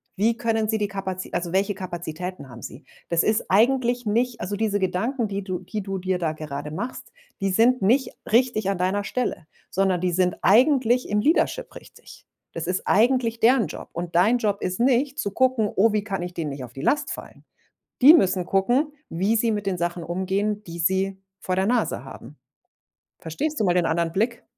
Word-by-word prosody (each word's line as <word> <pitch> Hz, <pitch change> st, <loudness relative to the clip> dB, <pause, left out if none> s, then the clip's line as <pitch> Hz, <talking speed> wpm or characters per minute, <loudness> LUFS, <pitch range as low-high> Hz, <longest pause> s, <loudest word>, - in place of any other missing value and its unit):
Wie 225 Hz, +4 st, +1 dB
können 225 Hz, -2 st, 0 dB
sie 220 Hz, -, +1 dB
die 205 Hz, -1 st, -1 dB
Kapazi 190 Hz, -2 st, -5 dB
also, 175 Hz, -1 st, -2 dB
welche 195 Hz, +2 st, +1 dB
Kapazitäten 180 Hz, -3 st, -6 dB
haben 120 Hz, -1 st, -11 dB
sie? 135 Hz, -, -9 dB, 0.3 s
Das 170 Hz, -1 st, +2 dB
ist 215 Hz, 0 st, +1 dB
eigentlich 245 Hz, +3 st, +2 dB
nicht 235 Hz, +3 st, 0 dB
also, 205 Hz, +3 st, -3 dB
diese 205 Hz, -1 st, 0 dB
Gedanken, 220 Hz, +6 st, -1 dB
die 200 Hz, 0 st, -4 dB
du 185 Hz, -2 st, -4 dB
die 205 Hz, +3 st, -5 dB
du 195 Hz, 0 st, -4 dB
dir 185 Hz, 0 st, -1 dB
da 160 Hz, -2 st, -1 dB
gerade 150 Hz, -1 st, -6 dB
machst, 235 Hz, +10 st, -6 dB, 0.3 s
die 195 Hz, -, +1 dB
sind 230 Hz, +5 st, +3 dB
nicht 250 Hz, +8 st, +2 dB, 0.2 s
richtig 230 Hz, -4 st, +2 dB
an 195 Hz, -, -1 dB
deiner 190 Hz, +3 st, 0 dB
Stelle, 200 Hz, -7 st, -3 dB, 0.2 s
sondern 190 Hz, -2 st, +1 dB
die 180 Hz, 0 st, 0 dB
sind 180 Hz, 0 st, +1 dB
eigentlich 250 Hz, +2 st, +4 dB
im 210 Hz, 0 st, +1 dB
Leadership 355 Hz, -, +1 dB
richtig. -, -, -14 dB, 0.3 s
Das 165 Hz, 0 st, -4 dB
ist 180 Hz, 0 st, -2 dB
eigentlich 230 Hz, +1 st, +2 dB
deren 235 Hz, -4 st, +4 dB
Job. -, -, -9 dB
Und 170 Hz, 0 st, -5 dB
dein 215 Hz, +8 st, +4 dB
Job 205 Hz, -2 st, -1 dB
ist 185 Hz, +2 st, -3 dB
nicht, 265 Hz, +4 st, +2 dB
zu 200 Hz, -, -1 dB
gucken: 255 Hz, -3 st, +2 dB
„Oh, 220 Hz, +3 st, +4 dB
wie 210 Hz, -1 st, 0 dB
kann 195 Hz, -4 st, -3 dB
ich 175 Hz, 0 st, -6 dB
denen 160 Hz, -4 st, -3 dB
nicht 135 Hz, -2 st, -7 dB
auf 120 Hz, -1 st, -10 dB
die 135 Hz, -, -7 dB
Last 295 Hz, -, +1 dB
fallen?“ -, -, -9 dB, 0.6 s
Die 295 Hz, +5 st, +10 dB
müssen 185 Hz, -, +3 dB
gucken, 245 Hz, +11 st, +1 dB, 0.2 s
wie 195 Hz, +7 st, 0 dB
sie 230 Hz, 0 st, +1 dB
mit 205 Hz, -1 st, -3 dB
den 190 Hz, -2 st, -1 dB
Sachen 175 Hz, 0 st, -2 dB
umgehen, 195 Hz, +4 st, -1 dB
die 170 Hz, 0 st, -8 dB
sie 190 Hz, +3 st, +1 dB, 0.2 s
vor 185 Hz, 0 st, -2 dB
der 190 Hz, +1 st, +1 dB
Nase 245 Hz, +3 st, 0 dB
haben. -, -, -11 dB, 0.8 s
Verstehst 285 Hz, -, -3 dB
du 210 Hz, -, +2 dB
mal 175 Hz, -, +3 dB
den 180 Hz, -2 st, +2 dB
anderen 165 Hz, 0 st, 0 dB
Blick? 230 Hz, +4 st, -1 dB
195 Hz, 200 wpm, -24 LUFS, 180-230 Hz, 0.8 s, Die